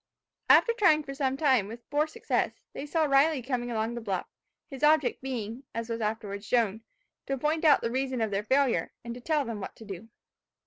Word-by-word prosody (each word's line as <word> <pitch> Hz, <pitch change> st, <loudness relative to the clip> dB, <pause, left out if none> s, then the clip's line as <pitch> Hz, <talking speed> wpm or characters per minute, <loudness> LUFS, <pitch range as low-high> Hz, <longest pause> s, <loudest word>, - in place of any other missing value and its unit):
After 465 Hz, -, +6 dB
trying 360 Hz, -10 st, +4 dB
for 275 Hz, -, -7 dB
some 270 Hz, -1 st, -1 dB
time, 260 Hz, -9 st, +3 dB
with 230 Hz, +2 st, -10 dB
poor 295 Hz, +2 st, +2 dB
success, 310 Hz, -, -2 dB
they 290 Hz, -, -6 dB
saw 320 Hz, +2 st, +1 dB
Riley 280 Hz, 0 st, +3 dB
coming 245 Hz, -1 st, -2 dB
along 225 Hz, 0 st, -1 dB
the 235 Hz, -, -5 dB
bluff; 195 Hz, -5 st, -2 dB, 0.4 s
his 270 Hz, -2 st, -9 dB
object 310 Hz, +9 st, +3 dB
being, 240 Hz, -3 st, -4 dB
as 230 Hz, 0 st, -4 dB
was 230 Hz, 0 st, -3 dB
afterwards 210 Hz, -2 st, -3 dB
shown, 225 Hz, -3 st, +1 dB, 0.5 s
to 275 Hz, -, -1 dB
point 305 Hz, +4 st, 0 dB
out 300 Hz, -3 st, +6 dB
the 230 Hz, -, -2 dB
reason 260 Hz, 0 st, -1 dB
of 220 Hz, -2 st, 0 dB
their 200 Hz, +1 st, -1 dB
failure, 265 Hz, +3 st, +1 dB
and 235 Hz, -, -4 dB
to 245 Hz, -, -10 dB
tell 300 Hz, +1 st, 0 dB
them 230 Hz, -3 st, -5 dB
what -, -, -7 dB
to 225 Hz, -, -13 dB
do. 200 Hz, +2 st, -8 dB
250 Hz, 210 wpm, -28 LUFS, 225-290 Hz, 0.5 s, After